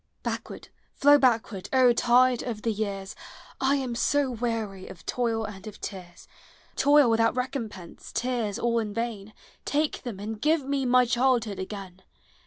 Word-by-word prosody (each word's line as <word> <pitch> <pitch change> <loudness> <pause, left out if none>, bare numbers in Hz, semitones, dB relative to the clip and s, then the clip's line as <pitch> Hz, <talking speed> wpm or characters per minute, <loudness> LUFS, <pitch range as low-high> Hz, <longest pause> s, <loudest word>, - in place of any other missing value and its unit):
Backward, - - -5 0.3
How 290 +1 +8
backward. 225 -7 +1
O 255 -2 +5
tide 245 +1 +4
of 225 -4 -5
the 230 - +1
years! 200 -2 -4 0.4
1 275 +2 +2
am 260 -3 -3
so 275 +3 +1
wearv 220 -5 -3
of - - -12
toil 230 -2 -1
and 210 0 -9
of 210 - -9
tears, 180 -3 -9 0.3
— - - -31
Toil 285 -1 +5
without 230 0 +2
recompense, 230 -8 -5
tears 235 -4 -1
all 235 0 +1
in 210 -2 -4
vain, 220 -3 -4 0.2
— - - -32
Take 305 0 0
them, 235 -7 -6
and 215 +1 -6
give 305 0 +2
me 275 -1 -1
my 250 0 +5
childhood 240 -4 +1
again! 190 -1 -7
230 Hz, 165 wpm, -27 LUFS, 210-255 Hz, 0.4 s, How